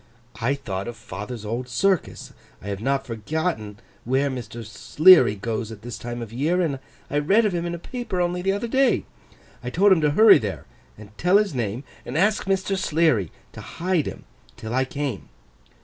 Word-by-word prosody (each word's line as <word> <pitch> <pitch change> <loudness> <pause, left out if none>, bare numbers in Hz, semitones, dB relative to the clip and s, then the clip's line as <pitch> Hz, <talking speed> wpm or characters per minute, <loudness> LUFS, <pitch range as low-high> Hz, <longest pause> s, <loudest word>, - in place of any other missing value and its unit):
I 130 +5 +1
thought 100 -8 -5
of 120 -1 -6
father's 110 +1 -7
old 120 +4 -4
circus. 185 +8 -1 0.3
I 100 - -8
have 100 0 -4
not 135 +2 0
forgotten 115 - -3 0.3
where 135 +3 +1
Mr. 115 -2 -7
Sleary 130 - +5
goes 110 +2 -4
at 110 -1 -11
this 120 0 -7
time 120 0 -5
of 115 -1 -10
year, 155 +9 0
and 150 -7 0 0.3
I 145 - +2
read 200 +10 +3
of 205 - 0
him 175 0 -2
in 170 - -3
a - - -6
paper 240 0 -5
only 175 0 0
the 195 +2 +1
other 205 +4 -2
day. 265 +1 +2 0.6
I 125 - -3
told 195 +9 +3
him 180 -4 +5
to 150 - +3
hurry 215 +7 +7
there, 105 -4 -5 0.3
and 105 0 -14
tell 180 +3 +4
his 205 -5 +1
name, 120 0 -3 0.2
and 130 - -5
ask 205 +4 +2
Mr. 195 0 0
Sleary 155 - +1 0.2
to - - -10
hide 175 -3 -1
him - - -7 0.3
till 110 +1 -6
I 130 +1 +2
came. 140 -5 -4
140 Hz, 195 wpm, -23 LUFS, 115-180 Hz, 0.6 s, hurry